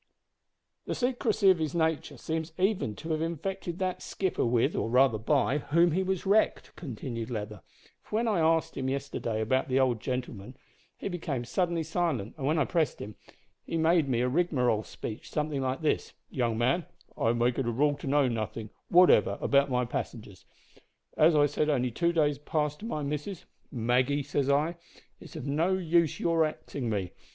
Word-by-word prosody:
"The - - -2
secrecy 240 -5 +2
of 180 - +1
his 155 0 -2
nature 160 -2 0
seems 160 0 -4
even 185 - 0
to 160 +11 -6
have 155 0 0
infected 170 +1 -3
that 185 -1 -2
skipper 190 -2 -2
with 120 -1 +2
or - - -1
rather 125 -2 +4
by 140 +4 +1
whom 170 +4 +3
he 180 +5 +1
was 190 -1 -2
wrecked," 205 +3 +1
continued 120 -5 -6
Leather, 105 -4 -5 0.4
"for - - -7
when 230 +2 +1
I 210 -6 +2
asked 160 0 +2
him 130 -1 -2
yesterday 130 -5 -3
about 130 +4 +1
the 130 +1 +2
old 125 -4 +2
gentleman, 125 -2 -5 0.4
he - - -5
became 160 -9 -3
suddenly 170 +3 0
silent, 160 - -1
and 140 -4 -3
when 155 +2 +2
I 145 - +3
pressed 165 -4 0
him, 105 - -7 0.5
he 165 - -3
made 160 -2 +3
me 120 -2 +1
a 125 - +2
rigmarole 125 -7 +1
speech 110 0 -8
something 150 -2 -2
like 130 +2 -2
this: 155 - 0 0.2
`Young 120 -4 0
man, 130 +8 +1 0.3
I 115 0 +1
make 120 +1 +1
it 130 - -1
a - - +1
rule 145 +5 +2
to - - -8
know 140 0 +3
nothin' 110 -2 -4 0.2
whatever 180 +1 +5
about 140 0 +3
my 125 -1 +1
passengers. 105 -5 -6 0.7
As 155 +1 +5
I 145 -1 +5
said 145 +1 0
only 125 -4 +1
two 170 +8 +1
days 150 -4 +1
past 150 0 -2
to 220 - -8
my 155 -9 -3
missus: 150 +5 -4 0.3
"Maggie," 125 +4 +1
says 140 0 -1
I, 150 +5 +1 0.4
"it's - - -13
of - - -6
no 160 +6 +1
use 170 -3 +1
your 165 -1 +2
axin' 140 -5 -4
me. 100 -5 -2
145 Hz, 185 wpm, -29 LUFS, 125-165 Hz, 0.7 s, whatever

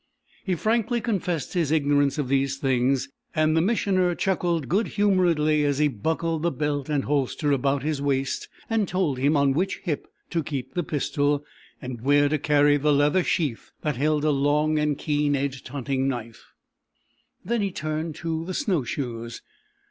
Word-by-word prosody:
He 185 -3 0
frankly 225 +5 +1
confessed 185 - -2
his 170 -5 +1
ignorance 145 -2 +2
of 145 -3 -1
these 135 0 +1
things, 135 0 +1 0.3
and 155 0 +3
the 160 - +4
Missioner 185 -3 +1
chuckled 175 -6 0
good 200 +7 +1
humouredly 170 -7 +2
as 145 -1 +1
he 150 0 +3
buckled 160 +6 -2
the 170 - +2
belt 145 -1 -2
and 145 -2 +1
holster 145 +1 0
about 140 0 +1
his 150 -2 -1
waist 135 -1 -1 0.2
and 225 -3 +1
told 170 -8 0
him 145 +3 +3
on 140 -1 +3
which 185 +7 0
hip 160 -6 -3 0.2
to 170 - +1
keep 140 -4 -5
the 175 - 0
pistol, 145 -1 0 0.3
and 125 -4 -7
where 145 +3 +4
to 155 0 0
carry 145 0 +4
the 150 +1 +2
leather 145 +5 +3
sheath 150 -11 -1
that 150 -4 -1
held 150 +2 +1
a 155 - +4
long 150 +2 +2
and 150 -2 0
keen 145 -1 +1
edged 135 -1 -3
hunting 135 0 -2
knife. 120 -4 -5 1.0
Then 235 -1 0
he 200 - 0
turned 155 -2 -3
to 165 -1 -3
the 185 - -4
snow 195 - +1
shoes. 120 -3 -5
150 Hz, 170 wpm, -25 LUFS, 140-170 Hz, 1.0 s, the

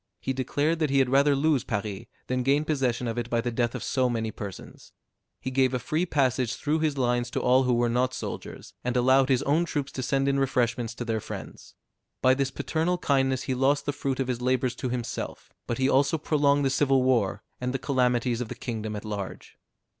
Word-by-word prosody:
He 130 +8 -2
declared 145 +5 0
that 155 -2 +1
he 140 - +2
had 135 -2 +3
rather 140 +1 +4
lose 145 -2 +2
Paris, 105 -2 -4 0.2
than 130 0 -1
gain 140 +4 +2
possession 130 -5 0
of 115 +1 -2
it 120 0 -4
by 115 - +1
the 120 +1 -1
death 120 0 0
of - - -4
so 130 -2 +1
many 110 -2 -2
persons. 100 -3 -9 0.5
He 130 - -4
gave 130 0 +2
a - - +2
free 155 +8 -1
passage 130 -5 +1
through 155 +1 0
his 155 -3 0
lines 120 -1 +1
to - - -2
all 130 +1 +4
who 125 - +2
were 120 0 +2
not 125 +2 +1
soldiers, - - -7
and 125 0 0
allowed 130 +2 +4
his 130 0 +3
own 150 +5 +2
troops 145 -5 -3
to 130 - -4
send 135 +1 0
in 140 0 +2
refreshments 125 -3 0
to 120 - -5
their 110 -1 -1
friends. - - -9 0.4
By 130 - +5
this 135 0 0
paternal 165 +6 -1
kindness 135 -5 +1
he 130 - -1
lost 135 +3 +2
the 145 - -1
fruit 135 -1 -2
of 135 - 0
his 125 -1 -2
labors 130 0 +1
to 130 - -3
himself; 120 -1 -5 0.2
but 120 - -2
he 130 0 +2
also 140 +3 +3
prolonged 145 -2 +2
the 135 - +2
civil 135 -1 +3
war, 120 -7 +1 0.2
and 125 0 -2
the 135 - -1
calamities 125 -3 +1
of 125 - -3
the - - -6
kingdom 110 -3 -4
at 105 - -6
large. 100 -3 -6
130 Hz, 220 wpm, -27 LUFS, 120-140 Hz, 0.5 s, By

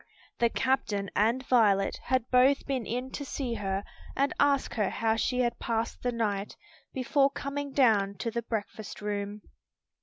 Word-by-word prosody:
The 235 - +4
captain 215 -7 0
and 235 +5 +2
Violet 205 -6 +3
had 255 -2 0
both 260 +2 +4
been 260 -5 -2
in 250 +2 -3
to 285 - -5
see 265 -3 -3
her 195 -2 -2 0.3
and 275 +1 +1
ask 285 -1 +2
how 220 +1 +1
she 250 +3 0
had 240 -1 0
passed 230 -1 -2
the 245 - 0
night, 210 -4 -2 0.4
before 275 +2 +2
coming 280 0 -4
down 215 -7 +3
to 230 +4 -3
the 235 - -2
breakfast 215 -2 -5
room. 205 0 -3
235 Hz, 155 wpm, -29 LUFS, 210-260 Hz, 0.4 s, The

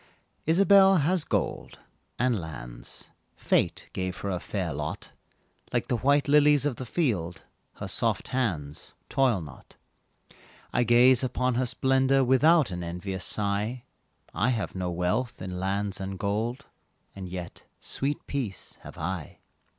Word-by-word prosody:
Isabelle 195 +3 +6
has 170 +3 +1
gold, - - -2 0.4
and 120 -5 +1
lands, - - -8 0.2
Fate - - 0
gave 95 0 -3
her 100 - -2
a 90 - -1
fair 90 -4 -3
lot; 75 +1 -5 0.6
Like - - -1
the 120 - +1
white 140 +4 +2
lilies 145 -1 +5
of 140 -5 -1
the 130 - -6
field 100 - -1 0.3
Her - - -6
soft - - -1
hands 85 - -3
toil 125 -8 +2
not. 75 -4 -12 1.0
I 125 - +2
gaze 120 +2 +6
upon 125 0 0
her 125 +1 0
splendor 135 +2 +3
Without 145 - +4
an 90 -1 -4
envious 90 +2 -4
sigh; 105 +4 -1 0.5
I 125 - +1
have 115 -5 -1
no 90 -1 -2
wealth 90 +8 -1
in 90 -1 -5
lands 100 +1 -1
and 95 0 -4
gold, 110 +7 -2 0.5
And 95 -2 -7
yet 90 -1 -7
sweet 140 +2 -3
peace 120 - -4
have - - -11
I. 85 -1 -4
110 Hz, 140 wpm, -27 LUFS, 90-130 Hz, 1.0 s, Isabelle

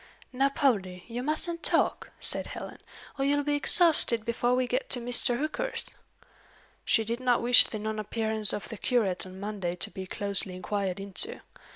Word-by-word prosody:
"Now, 270 +2 +1
Poldie, 200 - -1
you 240 +1 -5
mustn't 325 +4 -2
talk," - - 0
said - - 0
Helen, - - -9 0.4
"or - - 0
you'll 290 +1 +1
be 295 +1 -1
exhausted 290 -7 +5
before 240 +1 0
we 255 0 0
get 250 +2 -3
to 250 - +1
Mr. 240 0 +2
Hooker's." 310 - -4 0.9
"She 225 - +1
did 230 +2 -4
not 250 -2 +1
wish 245 +1 +7
the 220 - -7
non 215 0 -4
appearance 220 0 +3
of 205 - -5
the 225 - -8
curate 200 -8 -1
on 185 +1 -12
Monday 200 -4 -4
to - - -2
be 190 +1 -8
closely 200 -2 -4
inquired 190 0 -3
into. 200 - -4
235 Hz, 175 wpm, -27 LUFS, 200-265 Hz, 0.9 s, wish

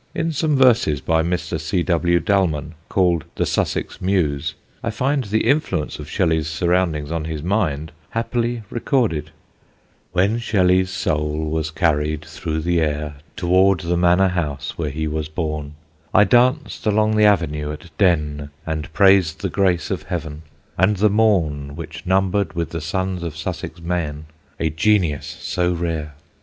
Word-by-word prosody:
In 165 - 0
some 155 0 +1
verses 120 - +4
by 80 +4 +1
Mr. 85 -1 -2
C. 80 +4 -1
W. 85 0 +2
Dalmon 85 -8 0 0.2
called 90 -5 +2
"The - - 0
Sussex - - -2
Muse," 85 -7 0 0.3
I - - -1
find 135 +4 0
the 110 +2 0
influence 105 - 0
of 75 0 -8
Shelley's 80 -5 +1
surroundings 85 -2 0
on 85 -2 -2
his 80 -2 -4
mind 80 -6 0 0.2
happily 120 0 -1
recorded: 115 - 0 0.8
"When 100 +6 +2
Shelley's 95 -5 +2
soul 75 -3 -1
was 80 -1 -1
carried 75 -2 0
through 80 0 -4
the 85 +1 +1
air 75 -1 -2 0.2
Toward 95 -1 +3
the 85 0 -1
manor 90 +2 +4
house 75 -6 -3
where 80 -3 -2
he 80 +3 -3
was 75 0 -3
born, 75 -2 -4 0.4
I 105 - +8
danced 125 +6 +2
along 110 +1 +3
the 105 0 +5
avenue 75 -7 +2
at 75 +2 -10
Denne, 75 -6 +1 0.2
And 80 -1 -4
praised 95 -3 +4
the - - -1
grace 95 -3 +1
of - - -1
Heaven, 80 -4 -5 0.4
and 95 +3 +3
the 105 +1 +3
morn 80 -10 +1
Which 85 +2 -8
numbered 95 +1 +1
with 85 -1 -3
the 85 - -4
sons 95 +3 -2
of 85 -2 -5
Sussex 85 -1 -5
men 80 -3 -3 0.3
A 80 -2 0
genius 80 -3 +1
so 90 0 0
rare! 80 -4 -3
85 Hz, 155 wpm, -21 LUFS, 75-95 Hz, 0.8 s, I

